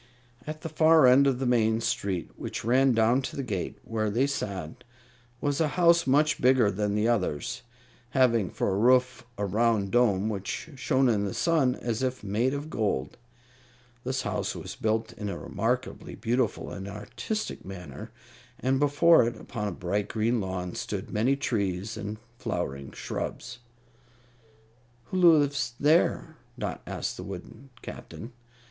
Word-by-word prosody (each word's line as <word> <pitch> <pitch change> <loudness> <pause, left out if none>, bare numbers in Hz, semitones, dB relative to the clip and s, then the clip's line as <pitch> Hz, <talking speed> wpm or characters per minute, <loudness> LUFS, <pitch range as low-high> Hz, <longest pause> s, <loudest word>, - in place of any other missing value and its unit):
At 155 0 -5
the 165 - -5
far 160 -1 +5
end 130 +3 +6
of 135 -2 +2
the 135 - -2
main 110 -2 +3
street, 95 -6 -2
which - - -6
ran 130 +2 +4
down 115 +3 +3
to 130 - -6
the 140 - -3
gate 100 -8 -3
where 110 -1 -1
they 120 +6 +2
sat, 100 - -4 0.6
was 145 +2 0
a 160 - +3
house 170 -3 +5
much 150 +3 +3
bigger 125 -4 +4
than 105 +1 -1
the 105 +2 +2
others, 110 - -1 0.5
having 120 -6 +3
for - - -1
a 95 - 0
roof 125 +2 +3
a 100 - -1
round 105 0 +1
dome 110 -5 +3
which 105 - -4
shone 130 +1 +2
in 105 -4 +2
the 100 - -4
sun 150 -7 +2
as 115 -1 -3
if 130 -2 -2
made 115 +7 0
of 145 +2 -5
gold. 100 - -1 0.9
This 130 +1 -2
house - - -2
was - - -7
built 110 +1 -1
in 105 -1 -5
a - - -4
remarkably 125 +5 -3
beautiful 120 +2 -1
and 95 0 -6
artistic 120 - -5
manner, 90 -7 -8 0.5
and 130 +1 +1
before 145 -1 +5
it, 115 -1 -5
upon 105 -4 -4
a - - -2
bright 100 +4 -2
green 115 +1 0
lawn, 90 -2 -4
stood - - -5
many 120 +6 +2
trees 100 -6 -2
and 105 0 -5 0.2
flowering 70 0 -3
shrubs. 125 0 -5 1.5
"Who 185 - 0 0.2
lives 135 -4 0
there?" 155 +4 +2 0.2
Dot - - -4
asked - - -3
the - - -6
wooden 100 +8 -9
Captain. 115 +3 -9
120 Hz, 155 wpm, -27 LUFS, 105-130 Hz, 1.5 s, end